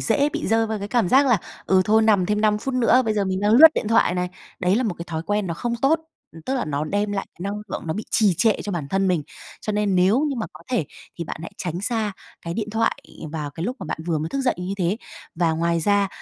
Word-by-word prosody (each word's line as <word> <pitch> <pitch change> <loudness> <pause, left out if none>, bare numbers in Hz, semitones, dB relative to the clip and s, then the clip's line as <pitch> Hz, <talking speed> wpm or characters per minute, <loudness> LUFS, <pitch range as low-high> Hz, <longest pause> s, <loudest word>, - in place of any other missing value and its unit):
dễ 285 +1 +2
bị 310 +1 -4
rơi 225 +1 +2
vào 220 -1 -3
cái 200 0 -5
cảm 235 -5 +1
giác 275 +6 +5
là 240 -5 +4 0.3
"ừ, 190 -1 +4
thôi 220 +3 +4
nằm 205 -5 +3
thêm 210 +1 0
5 210 -1 +3
phút 255 +4 -4
nữa, 255 +1 +4
bây 220 -1 0
giờ 205 -2 +1
mình 190 0 -1
đang 205 +1 +2
lướt 300 +8 +10
điện 215 - -2
thoại 225 - +5
thoại - - -1
này." 180 0 -1 0.3
Đấy 180 +2 +2
là 250 - +1
một 215 -7 -1
cái 170 - -5
thói 160 -1 -3
quen 205 +2 -1
nó 170 - -3
không 235 +7 -2
tốt, 315 +4 +3 0.3
ừm, 165 - -12
tức 265 - -2
là 255 - -1
nó 150 -1 -2
đem 205 +5 -1
lại 195 - -2
cái - - -31
năng 200 +1 -2
lượng - - -4
nó 160 - -1
bị 215 - -4
trì 205 -5 +3
trệ 225 -2 +4
cho 205 - -4
bản 155 -6 -3
thân 195 +2 +1
mình, 175 -4 +1 0.4
cho 215 - -3
nên 205 -2 +1
nếu 185 +7 +4
như 290 -3 -1
mà 220 - -2
có 155 - -13
thể 240 -11 +1 0.3
thì 170 - -3
bạn - - -6
hãy 165 - -7
tránh 175 -1 -3
xa 215 -1 -1 0.3
cái 170 0 -4
điện 215 +1 -3
thoại 225 +1 +1 0.4
vào 150 -3 -4
cái 160 +4 -5
lúc 250 +6 -3
mà - - -7
bạn - - -4
vừa 165 -3 0
mới 155 +2 -3
thức 275 - -2
dậy 260 -2 +1
như 180 +2 -3
thế. 185 +1 0 0.4
Và 165 -1 +1
ngoài 170 +1 0
ra 200 +3 +2
205 Hz, 290 wpm, -23 LUFS, 175-225 Hz, 0.4 s, lướt